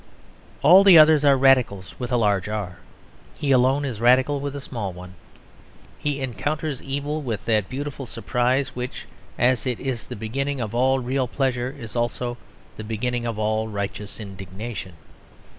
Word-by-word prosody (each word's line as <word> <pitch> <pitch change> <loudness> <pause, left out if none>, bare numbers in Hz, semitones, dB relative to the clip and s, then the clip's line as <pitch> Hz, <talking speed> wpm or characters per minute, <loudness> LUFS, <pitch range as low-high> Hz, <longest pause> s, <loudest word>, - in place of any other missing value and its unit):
All 180 +7 +8
the 190 -4 +9
others 155 -1 +7
are 140 -2 +5
Radicals 130 -8 +3
with 125 0 -4
a 125 - +3
large 105 -3 +1
R; 100 -5 -4 0.6
he 145 -3 -1
alone 130 +2 +3
is 115 -5 -5
radical 130 +4 +4
with 140 0 -4
a - - -4
small 115 -8 -5
one. 90 +1 -11 0.9
He 145 -1 -2
encounters 140 +4 -3
evil 145 +3 -3
with 115 -7 -4
that 110 -4 +1
beautiful 135 0 -5
surprise 125 +3 0
which, 125 +1 -5 0.3
as 130 +1 +2
it 125 -2 -2
is 130 -4 -4
the - - -6
beginning 135 +6 -3
of 110 -3 -4
all 130 +2 +3
real 130 +1 -1
pleasure, 130 0 -1
is 115 -3 -8
also 120 0 -2 0.4
the 110 - -6
beginning 120 +2 -2
of 115 -2 -3
all 110 +1 0
righteous 105 0 -5
indignation. 95 0 -7
125 Hz, 160 wpm, -23 LUFS, 110-135 Hz, 0.9 s, the